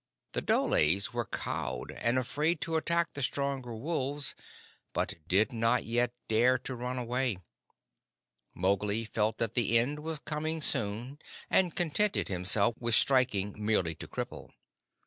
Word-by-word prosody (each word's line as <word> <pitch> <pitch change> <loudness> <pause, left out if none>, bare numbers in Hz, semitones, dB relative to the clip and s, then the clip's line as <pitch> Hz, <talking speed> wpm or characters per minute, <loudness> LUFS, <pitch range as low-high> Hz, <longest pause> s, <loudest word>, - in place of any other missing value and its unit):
The - - -1
dholes 95 +9 +2
were 120 -2 -2
cowed - - -4
and 120 +2 -1
afraid 150 +6 0
to 165 -1 -2
attack 170 +1 0
the 145 - -5
stronger 135 -2 -2
wolves, 140 +2 0 0.6
but - - -1
did 105 +8 +2
not 115 +2 +1
yet 120 +1 0 0.2
dare 120 +4 +3
to 135 - -6
run 125 +1 -4
away. 125 -2 -1 1.2
Mowgli 100 +4 +1
felt 110 0 -1
that 115 -1 +1
the 115 -1 +3
end 140 +6 +1
was 160 +1 -4
coming 155 +2 -3
soon, 120 +1 -1 0.3
and 180 -3 +4
contented 180 +5 +2
himself 100 +4 +3
with 115 -1 +2
striking 105 -6 +2
merely 100 -6 +1
to - - -10
cripple. - - -6
120 Hz, 140 wpm, -30 LUFS, 110-145 Hz, 1.2 s, and